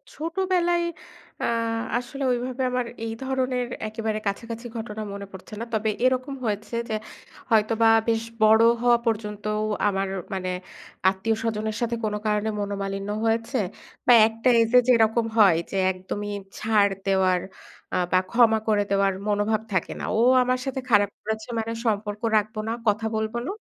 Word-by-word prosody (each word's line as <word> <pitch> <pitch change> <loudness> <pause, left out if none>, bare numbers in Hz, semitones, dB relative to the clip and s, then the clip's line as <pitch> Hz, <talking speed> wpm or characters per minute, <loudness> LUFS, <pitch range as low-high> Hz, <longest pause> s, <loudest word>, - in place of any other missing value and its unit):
ছোটবেলায় 345 +1 0 0.6
আ - - 0 0.5
আসলে 275 +3 -5
ওইভাবে 250 +1 -2
আমার 250 -1 0 0.2
এই 225 - -3
ধরনের 255 -2 -1 0.2
একেবারে 220 0 -3
কাছাকাছি 230 +3 -4
ঘটনা 220 -1 -5
মনে 200 0 -6
পড়ছে 190 +3 -12
না। 230 - -3
তবে 220 0 +1 0.2
এরকম 255 +2 +1
হয়েছে 215 +2 -3
যে - - -2 0.6
হয়তোবা 225 +1 +3 0.2
বেশ 225 0 +1 0.2
বড় 220 +1 +6 0.2
হওয়া 240 -1 +5
পর্যন্তও 210 -1 -2 0.3
আমার 195 -1 0 0.3
মানে 185 -1 -2 0.6
আত্মীয় 195 +4 -1
স্বজনের 220 -1 -2
সাথে 235 0 0
কোন 210 - -1
কারণে 210 +1 +1
মনোমালিন্য 200 0 -3 0.2
হয়েছে। 225 +3 0 0.5
বা 245 - +8
একটা 225 +2 0
এইজে 230 +2 +5
যেরকম 230 -1 +4
হয় 195 -6 +6
যে 195 - -2
একদমই 205 +3 -5 0.3
ছাড় 210 -2 +3
দেওয়ার 190 -2 +3 0.6
আ - - +2
বা 185 - +5
ক্ষমা 230 -2 +5
করে 210 -2 +3
দেওয়ার 195 -1 +3
মনোভাব 210 +1 +1
থাকে 185 - 0
না। - - -4
ও - - +2 0.2
আমার 255 0 0
সাথে 265 0 -2
খারাপ 205 -3 +4
করেছে 220 +1 -4
মানে 225 +1 -3
সম্পর্ক 210 -1 -1 0.2
রাখবো 215 +1 -1
না, 225 - 0
কথা 215 +2 +2
বলব 220 0 -2
না, - - -2
220 Hz, 150 wpm, -25 LUFS, 205-235 Hz, 0.6 s, বা